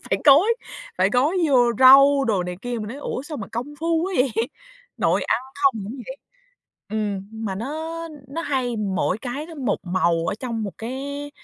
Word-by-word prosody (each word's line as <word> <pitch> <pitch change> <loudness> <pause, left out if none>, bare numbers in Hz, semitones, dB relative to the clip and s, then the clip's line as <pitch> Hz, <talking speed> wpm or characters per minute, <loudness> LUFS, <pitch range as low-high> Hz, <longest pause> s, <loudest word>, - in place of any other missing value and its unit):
phải - - +2
gói 315 +11 +6 0.4
phải 190 +2 +3
gói 260 - +2
vô 245 -4 +4
rau" 275 +2 +8
đồ 205 -7 +1
này 180 0 -5
kia. 245 -1 -3
Mình 210 - -5
nói: 245 - -7
"Ủa, 285 -2 -4
sao 300 +1 -7
mà 200 - -6
công 250 +6 -4
phu 330 0 +1
quá 380 +2 -2
vậy?" 255 -1 +2 0.6
Nội - - +1
ăn - - +1 0.2
không 275 -1 +6
cũng 220 +7 -6
vậy. 265 - -7 0.7
Ừm, 205 -2 -3
mà 220 -3 -4
nó 310 +10 -4 0.3
nó 330 +4 -4
hay 255 -6 -1
mỗi 195 -2 -1
cái 270 +6 -5
nó 330 - -10
một 265 -7 -1
màu 170 -2 +1
ở - - 0
trong 230 -3 -3
một 200 -3 -4
cái 280 +5 -5
250 Hz, 195 wpm, -23 LUFS, 215-285 Hz, 0.7 s, rau